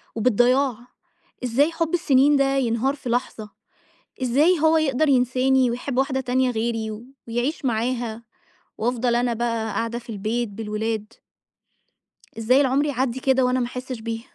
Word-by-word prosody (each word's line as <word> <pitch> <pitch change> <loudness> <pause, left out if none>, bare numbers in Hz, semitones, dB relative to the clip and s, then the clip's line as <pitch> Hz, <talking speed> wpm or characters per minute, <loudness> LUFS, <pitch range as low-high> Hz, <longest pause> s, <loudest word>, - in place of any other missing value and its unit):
وبالضياع، 245 +3 +2 0.7
إزاي 265 +6 +2
حُب 330 0 -2
السنين 290 -4 +4
ده 275 0 +2
ينهار 255 +2 0
في 265 -4 -7
لحظة؟ 235 -3 -2 0.7
إزاي 295 +8 +3
هو 320 +1 +4
يقدَر 310 -1 +1
ينساني 255 0 +2
ويحب 250 +2 -4
واحدة 265 0 +1
تانية 255 0 +1
غِيري 225 -1 -2 0.4
ويعيش 245 +6 -2
معاها، 235 -1 -2 0.5
وأفضَل 240 +1 0
أنا 240 0 +1
بقى 230 -1 -2
قاعدة 230 +1 -2
في 240 0 -19
البيت 220 +3 -2
بالولاد؟! 215 +1 -4 1.3
إزاي 250 +4 +3
العمر 275 +1 +2
يعدّي 260 -3 -1
كده 265 0 +2
وأنا 250 +1 +1
ما 240 - 0
أحسش 250 0 -6
بيه؟ 225 0 -4
250 Hz, 140 wpm, -23 LUFS, 230-265 Hz, 1.3 s, السنين